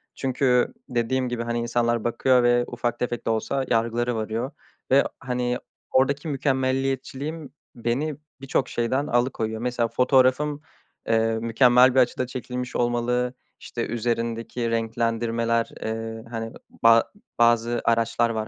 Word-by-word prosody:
Çünkü 130 Hz, -2 st, +1 dB, 0.2 s
dediğim 125 Hz, +1 st, 0 dB
gibi, 120 Hz, -1 st, -2 dB
hani, 120 Hz, 0 st, -2 dB
insanlar 120 Hz, -1 st, 0 dB
bakıyor 125 Hz, +2 st, +3 dB
ve 120 Hz, 0 st, +4 dB
ufak 120 Hz, -1 st, -3 dB
tefek 120 Hz, -1 st, -3 dB
de -, -, 0 dB
olsa 130 Hz, +4 st, -1 dB
yargılara 115 Hz, +1 st, +1 dB
varıyor 110 Hz, +4 st, -3 dB, 0.4 s
ve 140 Hz, +1 st, +6 dB, 0.2 s
hani 125 Hz, -1 st, -1 dB, 0.3 s
oradaki 140 Hz, +4 st, +2 dB
mükemmeliyetçiliğim 135 Hz, +1 st, -2 dB, 0.2 s
beni 125 Hz, +6 st, -1 dB, 0.3 s
birçok 135 Hz, -1 st, -1 dB
şeyden 130 Hz, +5 st, -1 dB
alıkoyuyor. 115 Hz, -3 st, 0 dB
Mesela 120 Hz, -1 st, 0 dB
fotoğrafım, 130 Hz, +4 st, +2 dB, 0.5 s
eee, 115 Hz, 0 st, +2 dB
mükemmel 125 Hz, +2 st, +5 dB
bir -, -, +6 dB
açıda 125 Hz, 0 st, +1 dB
çekilmiş 125 Hz, 0 st, -5 dB
olmalı, 120 Hz, +1 st, 0 dB, 0.3 s
işte, 115 Hz, -, -4 dB
üzerindeki 115 Hz, 0 st, -2 dB
renklendirmeler, 115 Hz, 0 st, 0 dB
eee, 110 Hz, 0 st, -4 dB
hani, 115 Hz, -1 st, -5 dB, 0.3 s
ba 115 Hz, 0 st, +7 dB, 0.4 s
bazı 120 Hz, 0 st, +3 dB
araçlar 115 Hz, 0 st, +2 dB
var, 110 Hz, -1 st, -2 dB
120 Hz, 125 wpm, -24 LUFS, 115-130 Hz, 0.5 s, ba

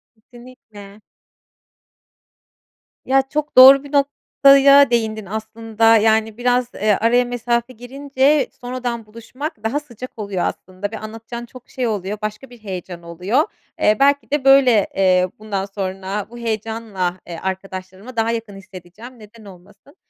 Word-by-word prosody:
Kesinlikle. 220 Hz, -3 st, -15 dB, 2.0 s
Ya, 270 Hz, +1 st, +3 dB
çok 295 Hz, +3 st, -4 dB
doğru 265 Hz, +2 st, +9 dB
bir 285 Hz, -, -12 dB
noktaya 280 Hz, -1 st, +4 dB
değindin. 220 Hz, -3 st, -1 dB
Aslında, 225 Hz, +2 st, +1 dB
yani, 220 Hz, 0 st, +2 dB
biraz, 245 Hz, 0 st, 0 dB
eee, 215 Hz, 0 st, +1 dB
araya 240 Hz, +2 st, +3 dB
mesafe 240 Hz, 0 st, -2 dB
girince 270 Hz, +3 st, 0 dB
sonradan 245 Hz, -2 st, -5 dB
buluşmak 230 Hz, +4 st, -8 dB
daha 255 Hz, +7 st, -1 dB
sıcak 255 Hz, -4 st, -11 dB
oluyor 200 Hz, -4 st, -3 dB
aslında 185 Hz, +2 st, -5 dB
ve 220 Hz, -, -5 dB
anlatacağın 225 Hz, +2 st, -8 dB
çok 250 Hz, +1 st, -15 dB
şey 255 Hz, -2 st, -3 dB
oluyor, 210 Hz, -2 st, -3 dB
başka 215 Hz, +5 st, -6 dB
bir 245 Hz, -, -14 dB
heyecan 180 Hz, -3 st, -7 dB
oluyor. 180 Hz, -, 0 dB, 0.4 s
Eee, 210 Hz, -, +3 dB
belki 280 Hz, +1 st, +2 dB
de, 290 Hz, -2 st, -1 dB
böyle, 265 Hz, -6 st, +5 dB
eee, 185 Hz, -1 st, +3 dB
bundan 205 Hz, -3 st, -4 dB
sonra 195 Hz, +1 st, -5 dB
bu 240 Hz, -, -11 dB
heyecanla, 220 Hz, -5 st, -4 dB
eee, 170 Hz, -1 st, -8 dB
arkadaşlarımı 190 Hz, +4 st, -7 dB
daha 225 Hz, 0 st, +1 dB
yakın 225 Hz, -3 st, -5 dB
hissedeceğim, 195 Hz, +5 st, -13 dB
neden 215 Hz, +1 st, -16 dB
olmasın. 200 Hz, -, -17 dB
225 Hz, 135 wpm, -19 LUFS, 200-255 Hz, 2.0 s, doğru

